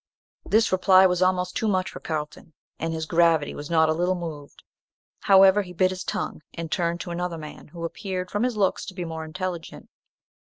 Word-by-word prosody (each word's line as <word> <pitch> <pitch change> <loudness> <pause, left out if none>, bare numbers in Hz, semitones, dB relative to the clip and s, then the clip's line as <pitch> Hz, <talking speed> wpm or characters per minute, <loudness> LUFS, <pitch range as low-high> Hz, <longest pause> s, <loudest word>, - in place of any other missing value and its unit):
This 220 +2 +2
reply 185 0 +6
was 180 -1 +2
almost 180 0 +1
too 220 - 0
much 185 -2 0
for - - -9
Carlton, 155 0 -5 0.3
and 165 +1 -2
his 160 -1 -3
gravity 165 -2 +2
was 145 +2 -8
not 160 -1 +4
a 155 - +2
little 175 +3 0
moved. 155 -5 -8 0.6
However, 195 0 +6
he 180 -2 -9
bit 185 +2 +2
his 185 -1 -5
tongue, - - -4
and 165 -2 -6
turned 170 -1 0
to 175 - -6
another 175 0 -3
man, 155 -1 -10
who 170 +2 -7
appeared, 185 +1 -5
from 205 - -1
his 245 -2 0
looks, 195 -2 +1
to 190 - -8
be 180 -2 -4
more 160 -1 -5
intelligent. 170 +1 -6
175 Hz, 200 wpm, -25 LUFS, 160-185 Hz, 0.6 s, reply